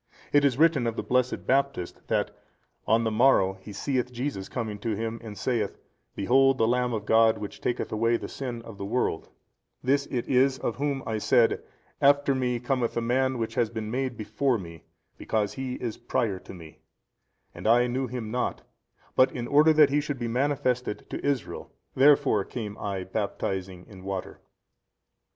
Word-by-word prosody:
It 145 0 +5
is 135 -4 +2
written 155 -6 +4
of 115 - -2
the - - -3
blessed 125 0 0
Baptist 135 -8 -1
that, - - 0 0.6
On 115 +2 +3
the 110 - 0
morrow 110 -5 +4
he 105 - -10
seeth 125 +4 -2
Jesus 125 -5 -4
coming 110 -4 -4
to 110 +1 -2
him 115 +2 -3
and 110 -2 -8
|280 - - -14
saith, 110 -2 -1 0.4
Behold 135 +5 +4
the 110 - +3
Lamb 125 +1 +1
of 110 -3 -3
God 110 0 +4
which 105 -1 -7
taketh 120 - -2
away 115 +2 +2
the - - -6
sin 120 -4 -6
of 110 -4 -11
the 100 - -4
world: 105 -6 -1 0.5
this 140 +2 +2
it 120 -3 -3
is 130 +1 +3
of 120 - -3
whom 140 -1 -1
I 110 -1 -2
said, 120 +1 +3 0.4
After 140 0 +4
me 125 -2 0
cometh 125 -1 -1
a - - +1
Man 130 +2 +1
which 115 -1 -3
has 115 -2 +1
been 110 -1 -5
made 130 -1 -2
before 125 +4 0
me 85 -4 -10 0.3
because 105 -2 -1
He 130 -1 -4
is 115 -3 -4
prior 115 -5 -1
to - - -12
me, 80 -3 -13 0.7
and - - -5
I 120 +2 +5
knew 130 +2 -1
Him 115 -3 -5
not, 125 +1 -2 0.5
but 130 0 +5
in 120 -2 -4
order 150 +4 +5
that 150 -2 +5
He 145 +1 +2
should 145 -2 -4
be 120 -1 -3
manifested 125 -2 -1
to - - -5
Israel, 140 -3 -2 0.2
therefore 140 -6 +4
came 105 -1 -6
I 100 -2 -3
baptizing 95 -2 -3
in 95 -3 -13
water. 95 -1 -5
120 Hz, 185 wpm, -27 LUFS, 110-130 Hz, 0.7 s, It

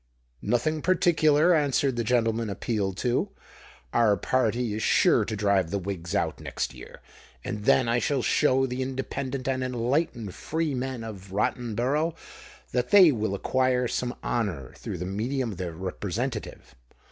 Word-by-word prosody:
"Nothing 155 +6 0
particular," 165 -2 +4
answered 140 -4 +2
the 120 - -1
gentleman 115 -1 +1
appealed 100 -2 -2
to. 120 +1 0 0.6
"Our 110 -4 +4
party 120 +1 0
is 110 - -3
sure - - +4
to 110 - -3
drive 100 -4 +2
the 100 - -1
Whigs 90 -3 -4
out - - 0
next - - -4
year; - - -12 0.4
and 110 -5 -5
then 130 - +4
I 120 +1 +2
shall 135 0 0
show 135 +1 +3
the 125 0 -3
independent 130 0 -4
and 130 -1 0
enlightened 125 - -1
freemen 135 -6 -3
of 100 -4 -9
Rottenborough 125 - 0 0.6
that 125 0 0
they 190 -6 +8
will 110 -5 -1
acquire 130 +3 +1
some 125 +1 -2
honour 95 - -2
through - - -6
the 90 - -4
medium 115 +6 -2
of 95 - -9
their 90 -3 -4
representative." 105 +7 -4
120 Hz, 145 wpm, -26 LUFS, 105-135 Hz, 0.6 s, they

